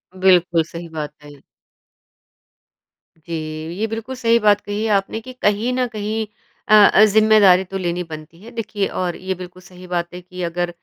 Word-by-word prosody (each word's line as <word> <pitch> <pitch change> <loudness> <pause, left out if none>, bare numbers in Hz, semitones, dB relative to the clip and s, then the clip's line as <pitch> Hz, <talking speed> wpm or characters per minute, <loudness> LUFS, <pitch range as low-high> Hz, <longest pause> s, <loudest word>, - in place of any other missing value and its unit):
बिल्कुल, 180 -3 +3
सही 170 +1 -9
बात 150 -2 -5
है। 145 -1 -13 1.9
जी, 170 - -7 0.5
ये 220 - 0
बिल्कुल 225 +4 -5
सही 235 -2 +2
बात 205 -2 +3
कही 205 +1 -4
है 225 - -1
आपने 200 +2 0
कि 255 +2 -10
कहीं 220 0 0
न 255 0 +1
कहीं 215 0 -3 0.4
अ 215 - +3 0.2
अ, 215 - +7
ज़िम्मेदारी 215 -3 +5
तो 195 +1 -6
लेनी 175 -1 -2
बनती 160 +1 -11
है, 230 - -11
देखिए 215 -4 -2
और 180 -2 -3
ये 190 0 -4
बिल्कुल 180 0 -11
सही 180 -1 -14
बात 175 -1 -3
है 180 - -8
कि 180 0 -10
अगर 175 +1 -2
190 Hz, 175 wpm, -20 LUFS, 175-215 Hz, 1.9 s, अ